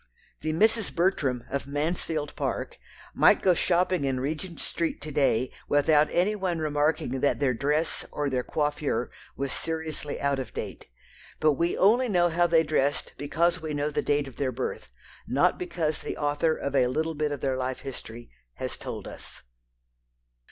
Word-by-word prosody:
The 155 Hz, -, -1 dB
Misses 220 Hz, +5 st, +3 dB
Bertram, 150 Hz, -9 st, +1 dB
of 140 Hz, 0 st, -2 dB
Mansfield 150 Hz, 0 st, -2 dB
Park, -, -, -3 dB, 0.3 s
might -, -, +5 dB
go 185 Hz, -, +6 dB
shopping 180 Hz, -1 st, +2 dB
in 135 Hz, -2 st, 0 dB
Regent 155 Hz, +6 st, -4 dB
Street 165 Hz, -1 st, -2 dB
to 155 Hz, -, -6 dB
day 135 Hz, -4 st, +2 dB, 0.2 s
without 150 Hz, +1 st, +4 dB
any 190 Hz, +5 st, +2 dB
one 185 Hz, -4 st, -1 dB
remarking 150 Hz, -3 st, 0 dB
that 140 Hz, -, +2 dB
their 135 Hz, -3 st, +2 dB
dress, 150 Hz, +6 st, 0 dB
or 145 Hz, -1 st, -1 dB
their 130 Hz, -2 st, 0 dB
coiffure, 145 Hz, -2 st, -1 dB, 0.3 s
was 140 Hz, -1 st, -2 dB
seriously 160 Hz, -2 st, -4 dB
out 140 Hz, -1 st, +1 dB
of 125 Hz, -4 st, -6 dB
date. -, -, -6 dB, 0.5 s
But 155 Hz, -, +5 dB
we 170 Hz, +4 st, 0 dB
only 235 Hz, +6 st, +4 dB
know 175 Hz, -3 st, +3 dB
how 175 Hz, +1 st, +3 dB
they 165 Hz, -1 st, +4 dB
dressed 145 Hz, -2 st, 0 dB
because 170 Hz, +4 st, +1 dB
we 155 Hz, -2 st, -3 dB
know 145 Hz, +1 st, 0 dB
the -, -, 0 dB
date 145 Hz, -1 st, +1 dB
of 130 Hz, -, -12 dB
their 135 Hz, -2 st, 0 dB
birth, 130 Hz, +1 st, -4 dB, 0.4 s
not 145 Hz, +8 st, +2 dB
because 170 Hz, -3 st, -2 dB
the -, -, -5 dB
author 145 Hz, +2 st, +1 dB
of 140 Hz, 0 st, -3 dB
a 130 Hz, -2 st, +4 dB, 0.3 s
bit 150 Hz, -1 st, -1 dB
of 145 Hz, -, -4 dB
their 135 Hz, -1 st, 0 dB
life 130 Hz, 0 st, -3 dB
history 120 Hz, -3 st, -8 dB, 0.2 s
has -, -, -4 dB
told -, -, -6 dB
us. -, -, -9 dB
150 Hz, 170 wpm, -27 LUFS, 140-170 Hz, 0.5 s, go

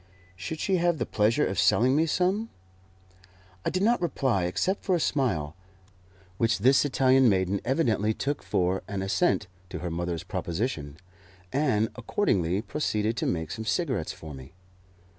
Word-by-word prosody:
Should 160 Hz, -, -6 dB
she 190 Hz, -2 st, +1 dB
have 175 Hz, -1 st, +2 dB
the 120 Hz, -, -1 dB
pleasure 110 Hz, +7 st, +2 dB
of 95 Hz, -, -2 dB
selling 130 Hz, +3 st, +4 dB
me 160 Hz, +2 st, +3 dB
some? 190 Hz, +7 st, 0 dB, 1.1 s
I -, -, 0 dB
did 185 Hz, +1 st, -1 dB
not 235 Hz, -1 st, +3 dB
reply 130 Hz, -, 0 dB
except 185 Hz, -, -1 dB
by 185 Hz, -, +3 dB
a -, -, 0 dB
smile, 85 Hz, -, 0 dB, 0.8 s
which 115 Hz, -1 st, +2 dB
this 130 Hz, +6 st, +4 dB
Italian 130 Hz, -2 st, +4 dB
maiden 95 Hz, 0 st, +1 dB
evidently 115 Hz, -6 st, +1 dB
took 140 Hz, +6 st, -2 dB
for 90 Hz, +1 st, 0 dB
an 95 Hz, -1 st, -3 dB
assent 105 Hz, -, +1 dB, 0.2 s
to -, -, -5 dB
her 85 Hz, +1 st, -4 dB
mother's 85 Hz, 0 st, -3 dB
proposition, 85 Hz, -, -3 dB, 0.6 s
and 130 Hz, -7 st, +2 dB
accordingly 100 Hz, -, 0 dB
proceeded 110 Hz, -6 st, -1 dB
to -, -, -1 dB
make 80 Hz, -2 st, -2 dB
some 110 Hz, -1 st, -5 dB
cigarettes 130 Hz, -, -1 dB
for 80 Hz, -2 st, -10 dB
me. 65 Hz, +1 st, -11 dB
115 Hz, 155 wpm, -27 LUFS, 90-150 Hz, 1.1 s, selling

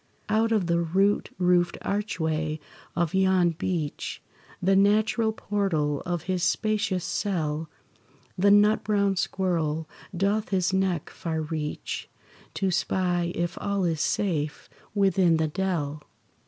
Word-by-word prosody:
Out 225 Hz, +1 st, +2 dB
of 215 Hz, -5 st, +2 dB
the 170 Hz, 0 st, +2 dB
root 190 Hz, +5 st, +1 dB
roofed 180 Hz, -1 st, +2 dB
archway 160 Hz, -6 st, -1 dB, 0.4 s
of 170 Hz, -2 st, 0 dB
yon 190 Hz, -2 st, +3 dB
beech, 165 Hz, -2 st, -3 dB, 0.4 s
The 190 Hz, +2 st, +3 dB
natural 215 Hz, +3 st, +3 dB
portal 170 Hz, -10 st, -1 dB
of 175 Hz, -3 st, -2 dB
his 185 Hz, 0 st, -1 dB
spacious 205 Hz, -1 st, 0 dB
cell, 160 Hz, -5 st, -2 dB, 0.7 s
The 200 Hz, +2 st, +3 dB
nut 210 Hz, +2 st, +5 dB
brown 200 Hz, -2 st, +2 dB
squirrel 165 Hz, -5 st, -1 dB, 0.3 s
doth 205 Hz, +3 st, +1 dB
his 185 Hz, -1 st, +1 dB
neck 190 Hz, -4 st, 0 dB
far 160 Hz, -2 st, -3 dB
reach, 155 Hz, -1 st, -4 dB, 0.5 s
To 195 Hz, -1 st, 0 dB
spy 180 Hz, -1 st, 0 dB
if 175 Hz, 0 st, -2 dB
all 200 Hz, -1 st, 0 dB
is 160 Hz, -3 st, 0 dB
safe 155 Hz, -7 st, -1 dB, 0.2 s
within 190 Hz, -4 st, +3 dB
the 160 Hz, 0 st, +1 dB
dell. 155 Hz, -4 st, -2 dB
180 Hz, 125 wpm, -26 LUFS, 160-200 Hz, 0.7 s, nut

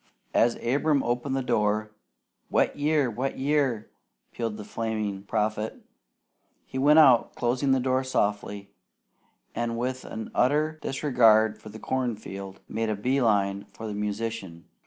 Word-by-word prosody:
As 115 Hz, +1 st, +3 dB
Abram 140 Hz, +3 st, +2 dB
opened 125 Hz, +3 st, -1 dB
the 135 Hz, -, -1 dB
door, 105 Hz, -2 st, 0 dB, 0.6 s
"Wet -, -, +2 dB
year! 145 Hz, -1 st, +2 dB
Wet 130 Hz, +5 st, -3 dB
year!" 135 Hz, -5 st, 0 dB, 0.4 s
pealed 115 Hz, -3 st, -3 dB
the 105 Hz, -, -7 dB
flaming 110 Hz, -3 st, -3 dB
prophet. 110 Hz, +1 st, -2 dB, 0.9 s
He 130 Hz, -, -5 dB
went 150 Hz, +3 st, +5 dB
out, 135 Hz, -7 st, +6 dB
closing 125 Hz, +3 st, 0 dB
the 135 Hz, -, +4 dB
door 130 Hz, +1 st, +1 dB
softly, 100 Hz, -4 st, -2 dB, 0.8 s
and 115 Hz, 0 st, -2 dB
with 130 Hz, +2 st, -2 dB
an 110 Hz, -1 st, -7 dB
utter 155 Hz, +4 st, +1 dB
disregard 115 Hz, -6 st, +3 dB
for 110 Hz, -, -10 dB
the 110 Hz, -, -9 dB
corn 125 Hz, +1 st, -1 dB
field, 95 Hz, -2 st, -9 dB
made 110 Hz, 0 st, -2 dB
a 110 Hz, -, 0 dB
bee 130 Hz, +7 st, 0 dB
line 100 Hz, -3 st, +1 dB
for 115 Hz, -, -10 dB
the 105 Hz, -, -4 dB
musician. 105 Hz, -4 st, -4 dB
115 Hz, 145 wpm, -27 LUFS, 105-130 Hz, 0.9 s, out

